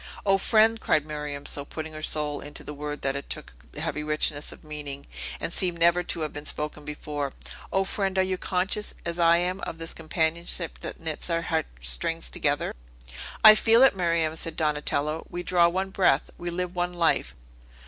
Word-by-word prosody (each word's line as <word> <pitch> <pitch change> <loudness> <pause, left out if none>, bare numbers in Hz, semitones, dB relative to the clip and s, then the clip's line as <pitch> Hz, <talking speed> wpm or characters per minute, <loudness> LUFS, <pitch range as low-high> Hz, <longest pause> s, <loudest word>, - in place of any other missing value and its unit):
"O 195 -1 +4
friend!" 220 +2 +4
cried 150 -1 +2
Miriam, 150 -2 -5
so 145 - 0
putting 155 +2 -7
her 155 - -7
soul 150 -1 +1
into 145 - -9
the 150 - -7
word 150 0 -5
that 135 0 +1
it 140 - -5
took - - -5 0.2
a - - -5
heavy 150 - -2
richness 150 -1 -1
of - - -14
meaning, 145 -2 -6 0.3
and 170 - -3
seemed 180 -3 +2
never 170 +1 +4
to 170 -1 -3
have 155 - -3
been 145 0 -7
spoken 150 0 -4
before, 145 -1 -4 0.4
"O 190 - +2
friend, 195 0 -2
are 190 - +5
you 185 0 -1
conscious, 190 +3 -2
as 170 0 -2
I 170 0 +6
am, 180 +2 -1
of 165 - -5
this 165 0 -6
companionship 165 +1 0
that - - -6
knits 160 +1 -3
our 165 0 0
heart 160 -2 0
strings - - 0
together?" - - 0 0.7
"I 215 - +12
feel 225 +3 +5
it, 265 - +6
Miriam," 165 -3 +1
said 160 0 -1
Donatello. 150 0 0
"We 175 0 -4
draw 175 -1 +4
one 190 +2 -1
breath; 180 -8 +2
we 175 - -4
live 180 +1 -3
one 175 0 -1
life!" 170 -2 +1
165 Hz, 195 wpm, -26 LUFS, 150-180 Hz, 0.7 s, I